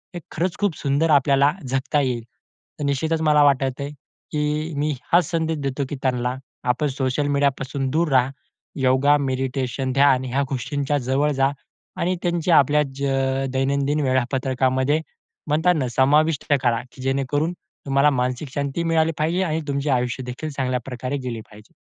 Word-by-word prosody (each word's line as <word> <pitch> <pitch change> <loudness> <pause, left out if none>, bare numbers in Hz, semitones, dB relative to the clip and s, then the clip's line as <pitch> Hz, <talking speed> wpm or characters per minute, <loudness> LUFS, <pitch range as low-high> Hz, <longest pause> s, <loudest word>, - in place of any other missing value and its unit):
हे - - -3
खरंच 175 +2 -2
खूप 205 -6 +1
सुंदर 145 +4 +1
आपल्याला 140 0 +4 0.2
जगता 135 +3 0
येईल. 125 -4 -1 0.6
तर - - -3
निश्चितच 160 +3 0
मला 150 -2 +4
वाटतंय 140 0 +1 0.4
की 150 +2 -1
मी 150 +1 0 0.2
हाच 175 0 +4
संदेश 160 -1 0
देतो 135 +1 -1
की - - -3
त्यांना 125 -1 0 0.3
आपण 125 +5 +1
सोशल 135 +1 -1
मीडिया 140 0 +4
पासून 135 0 -3
दूर 165 +3 +1
रहा. 130 -1 +4 0.5
योगा, 130 +3 +4
मेडिटेशन, 130 0 -2
ध्यान 135 -1 +4
ह्या 130 +2 0
गोष्टींच्या 140 +2 -1
जवळ 135 +3 +1
जा. 135 -1 +2 0.5
आणि 180 +2 +1
त्यांचे 175 -1 0
आपल्या 150 -1 +5
ज 140 - -5
अ, 135 0 0
दैनंदिन 140 +2 +1
वेळापत्रकामध्ये 130 +2 +1 0.5
म्हणताना 155 -2 +2
समाविष्ट 150 +3 +3 0.2
करा, 120 -2 +2
की 130 - -13
जेणेकरून 140 +5 0
तुम्हाला 140 -4 0
मानसिक 125 +1 -1
शांती 140 +3 -2
मिळाली 165 -1 +2
पाहिजे. 165 +5 +1
आणि 160 -2 -1
तुमचे 140 +1 -1
आयुष्य 125 0 0
देखील 125 +5 -5
चांगल्या 130 -3 -1
प्रकारे 125 +1 -4
गेले 115 -2 -4
पाहिजे. 105 +1 -16
140 Hz, 155 wpm, -22 LUFS, 130-150 Hz, 0.6 s, आपल्या